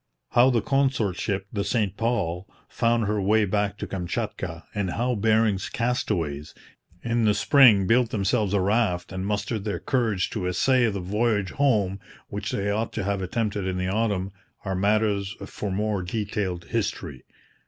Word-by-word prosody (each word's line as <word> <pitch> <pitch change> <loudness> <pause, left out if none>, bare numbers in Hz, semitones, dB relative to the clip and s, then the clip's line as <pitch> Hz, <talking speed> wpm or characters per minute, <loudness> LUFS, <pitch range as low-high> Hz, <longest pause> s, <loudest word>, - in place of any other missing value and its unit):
How 125 +2 +5
the 120 -4 +1
consort 135 -9 +1
ship, 100 -2 -2
the 100 -2 -1
St 100 -2 0
Paul, 100 -7 -1 0.2
found 115 -1 +1
her 105 0 0
way 105 +2 +3
back 100 +1 -1
to - - -4
Kamchatka, 90 -1 -4
and 100 -3 -1
how 120 +6 0
Bering's 110 -2 +2
castaways 85 - -2 0.5
in 115 -1 +1
the 105 -1 +3
spring 120 -9 +6
built 120 +3 +3
themselves 105 0 0
a 100 - +2
raft 100 -3 +1
and 95 +1 -4
mustered 105 +1 -2
their 105 -1 -2
courage 110 -8 0
to 95 -5 -2
essay 120 +7 +3
the 100 -2 -3
voyage 105 +1 0
home 105 -9 +1 0.3
which - - -4
they 100 +1 -1
ought 110 +2 -2
to - - -2
have 100 0 -1
attempted 100 0 -2
in 95 -1 -2
the 90 0 -1
autumn, 100 -2 0 0.3
are 95 - -1
matters 100 +1 +1
for 105 - -5
more 105 0 -1
detailed 95 -2 -3
history. 65 - -3
105 Hz, 165 wpm, -25 LUFS, 95-115 Hz, 0.5 s, spring